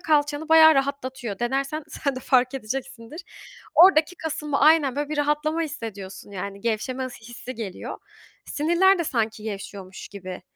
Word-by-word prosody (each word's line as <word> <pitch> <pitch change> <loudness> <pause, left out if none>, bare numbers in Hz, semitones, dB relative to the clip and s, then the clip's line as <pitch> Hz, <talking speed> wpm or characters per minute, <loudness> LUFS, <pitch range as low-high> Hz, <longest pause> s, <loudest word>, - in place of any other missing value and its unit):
kalçanı 295 -1 +1
bayağı 320 -1 +8
rahatlatıyor. 260 -6 -2
Denersen 275 +5 -2
sen 280 -4 -3
de - - -4
fark 255 0 +2
edeceksindir. 255 +3 -6 0.5
Oradaki 350 -1 +6
kasılma 300 -2 -3
Aynen, 295 -3 +5
böyle, 290 0 -2
bir 305 - -3
rahatlama 300 +2 +1
hissediyorsun 205 -10 -7
yani 200 +1 -6
gevşeme 250 +4 -2
ıs 245 -2 -11
hissi 240 +2 -9
geliyor. 215 -6 -6 0.5
Sinirler 345 +6 +3
de 340 - 0
sanki 225 -6 -1
gevşiyormuş 195 -3 -7
gibi 185 -2 -8
270 Hz, 140 wpm, -24 LUFS, 225-305 Hz, 0.5 s, bayağı